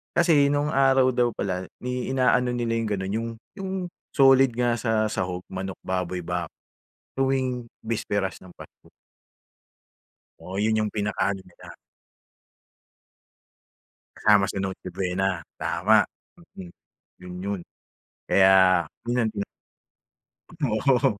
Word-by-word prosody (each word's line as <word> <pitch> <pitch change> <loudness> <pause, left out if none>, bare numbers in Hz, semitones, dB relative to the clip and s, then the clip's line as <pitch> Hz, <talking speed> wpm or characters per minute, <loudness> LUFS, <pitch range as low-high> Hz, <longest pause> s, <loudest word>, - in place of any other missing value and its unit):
Kasi 165 -5 +5
no'ng 145 +1 0
araw 135 -2 +4
daw 120 -1 +1
pala, 95 -1 -3 0.2
ni 125 +1 -3
ina-ano 125 -1 +2
nila 115 -1 -1
'yong 115 -2 -2
gano'n, 95 +1 -4
'yong 115 0 -3 0.3
'yong 190 -1 -4 0.4
solid 135 -2 +6
nga 120 -1 +1
sa 110 -1 +1
sahog, 90 -2 -3
manok, 95 0 -5
baboy, 90 -1 -2
bak 90 -1 -3 0.7
tuwing 130 -3 -1
bisperas 100 -4 -3
ng 95 - -13
Pasko. - - -15 1.5
Oo, 95 +2 -7
'yon 110 0 +2
'yong 110 -1 -1
pinaka-ano 100 -2 -1
nila. 90 - -17 2.5
Kasama 100 -2 +4
sa - - -4
Noche 95 -1 -4
Buena, 95 0 -1 0.2
tama! 105 +5 +3 0.6
Mm. 90 -2 -9 0.5
'Yon 90 0 -9
'yon! 100 -2 -3 0.7
Kaya 95 -2 +5 0.2
'yon 120 0 +1
ang 110 - 0
tina 100 -1 -4 1.0
Oo, 130 - +1
110 Hz, 115 wpm, -25 LUFS, 95-125 Hz, 2.5 s, solid